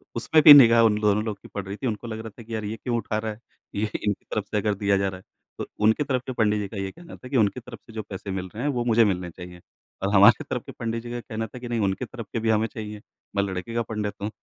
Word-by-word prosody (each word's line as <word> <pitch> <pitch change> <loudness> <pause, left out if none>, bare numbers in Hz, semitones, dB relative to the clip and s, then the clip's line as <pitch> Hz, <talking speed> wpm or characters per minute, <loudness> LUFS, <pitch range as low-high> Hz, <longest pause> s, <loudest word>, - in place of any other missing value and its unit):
उसमें 155 +7 +3
भी 150 - +12
निगाह 115 -4 +8
उन 105 -1 +3
दोनों 105 0 +2
लोगों 110 -2 -3
की - - -13
पड़ 100 - -5
रही 100 +1 -5
थी। 130 - -3
उनको 115 +1 -4
लग 110 -1 -5
रहा 110 0 -7
था - - -9
कि, 115 +1 -9
"यार, 110 - -3
ये 110 +2 -3
क्यों 120 -2 0
उठा 110 -1 -2
रहा 110 0 -2
है, 105 - -10 0.4
ये 105 +1 -1 0.2
इनकी 105 -1 -1
तरफ 105 -2 -3
से 105 - 0
अगर 105 0 +1
दिया 100 0 +1
जा 95 0 0
रहा 95 -1 -8
है?" - - -20 0.4
तो - - -2 0.2
उनकी 110 +7 +4
तरफ 130 -3 -1
के - - -2
पंडित 105 -2 +2
जी 100 - -3
का 100 - -9
ये 95 -1 -3
कहना 170 0 -12
था 130 - -12
कि, 135 - +1
"उनकी 110 +3 +2
तरफ 120 - -11
से 110 - -13
जो 110 - -3
पैसे 95 0 -6
मिल 95 -1 -3
रहे 115 +5 -5
हैं, 145 - +1
वो 120 -2 -1
मुझे 115 -1 +4
मिलने 90 -3 -1
चाहिए।" 90 +1 -11 0.4
और 100 +1 0
हमारे 100 +5 +7
तरफ 125 - -2
के - - -8
पंडित 115 0 -4
जी 120 - -7
का 120 - -3
कहना 110 +1 -5
था 125 - -10
कि, 120 - -7
"नहीं, 120 -1 -1
उनकी 95 - -3
तरफ 115 -5 -9
के 115 - 0
भी 115 0 -1
हमें 110 +1 +2
चाहिए, 105 -2 -8 0.3
मैं 100 - +2
लड़के 95 +3 -4
का 115 - +1
पंडित 105 -1 -2
हूँ।" 105 - -2
110 Hz, 310 wpm, -25 LUFS, 100-115 Hz, 0.4 s, भी